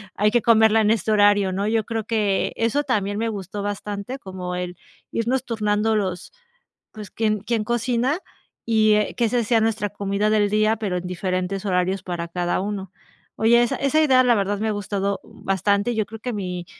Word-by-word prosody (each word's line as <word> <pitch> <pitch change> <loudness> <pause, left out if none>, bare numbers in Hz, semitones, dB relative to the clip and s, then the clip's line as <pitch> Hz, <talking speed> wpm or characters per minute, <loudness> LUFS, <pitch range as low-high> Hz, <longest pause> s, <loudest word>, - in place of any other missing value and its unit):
hay 210 +2 +3
que 240 +1 +3
comerla 220 -1 +5
en 215 0 +3
este 220 -1 0
horario", 205 -2 +4
¿no? 195 +2 -1
Yo 220 0 +1
creo 225 -1 -3
que 210 -3 0
eso 230 +6 0
también 205 -7 -1
me 225 +1 -1
gustó 200 -1 -5
bastante, 205 +4 -4
como 185 -3 -6
el, 180 -1 -5 0.3
irnos 245 +3 0
turnando 220 -2 0
los 185 -4 -2 0.6
pues, 210 -2 -9
quién 215 -1 0
quién 220 +1 -1
cocina 240 - 0 0.5
y, 220 -2 +4
eh, 210 0 +1
qué 235 - +2
se 240 +1 +1
sea 225 +1 +2
nuestra 220 -2 0
comida 200 +1 -1
del 210 -1 +2
día, 215 +1 +3
pero 200 -4 -2
en 180 0 -5
diferentes 185 +2 -2
horarios 185 0 0
para 175 -2 -4
cada 175 +1 -1
uno. 195 -2 -4 0.4
Oye, 235 +2 +4
esa 240 - 0
esa 275 +3 +1
idea 260 -4 +5
la 245 -2 +4
verdad 200 0 -1
me 220 - -1
ha - - +1
gustado, 200 -1 -2
uh, - - -17
bastante. 200 +4 +1
Yo 215 -1 0
creo 225 +2 -10
que 245 +1 -3
mi 180 -4 -4
210 Hz, 195 wpm, -22 LUFS, 195-225 Hz, 0.6 s, comerla